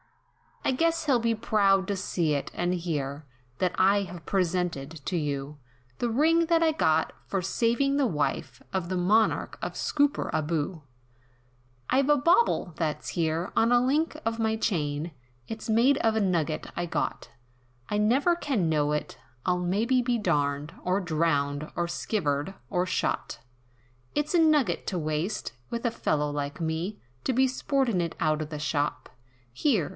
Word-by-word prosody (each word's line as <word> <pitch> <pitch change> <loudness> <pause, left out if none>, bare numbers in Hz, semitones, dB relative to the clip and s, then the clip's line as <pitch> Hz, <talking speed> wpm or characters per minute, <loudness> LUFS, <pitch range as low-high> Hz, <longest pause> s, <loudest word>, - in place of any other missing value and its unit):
"I - - +3
guess 330 +3 +1
he'll 270 -5 +3
be 230 0 +1
proud 200 -3 +2
to 200 - 0
see 175 -5 0
it, 140 - -2
and 175 +1 0
hear, 150 -5 -3 0.3
That 180 -1 +1
I 200 +2 +4
have 175 -4 -9
presented 170 -5 -1
to 180 - -1
you, 145 -1 -3 0.4
The 240 - 0
ring 325 +7 +3
that 330 0 +3
I 320 - +4
got, 160 - +1
for 195 - -1
savin' 235 +8 +1
the 280 -3 +3
wife, 150 -8 -2
Of 185 -2 -1
the 185 - -1
Monarch 210 +5 +2
of - - -3
Scooperaboo. 165 - 0 1.1
"I've 270 +2 +3
a 295 - +6
bauble 335 - +3
that's 155 -3 -2
here, 165 +2 -1
on 230 +1 +3
a 245 0 +5
link 305 +4 +1
of 225 0 -1
my 220 0 +1
chain, 160 -7 -1 0.4
It's 220 +1 -6
made 240 +5 +4
of 225 -1 +2
a 220 - +2
nugget 165 -5 0
I 175 0 -2
got, - - -2 0.6
I 210 - 0
never 260 +11 +3
can 255 - 0
know 150 -1 +2
it, 150 - -3 0.3
I'll 180 0 +2
maybe 215 +9 +2
be 245 -1 +1
darned! 145 -6 0
Or 185 +2 +1
drowned! 155 -4 0
or 175 - 0
skivered! 160 -3 -1
or 180 0 +1
shot! 185 - -2 0.8
"It's 295 +2 0
a 345 - +5
nugget 310 -5 +3
to 185 - -1
waste, 155 - -2 0.2
with 235 +1 -4
a 235 - +2
fellow 150 -9 0
like 145 +3 -4
me, 165 +6 -2 0.3
To 260 - +1
be 260 +2 +4
sportin' 255 -6 0
it 170 -1 -3
out 155 -1 +1
of 155 - -4
the 150 -2 -5
shop, 145 -2 -1 0.4
Here! 205 - +1
185 Hz, 165 wpm, -27 LUFS, 155-240 Hz, 1.1 s, a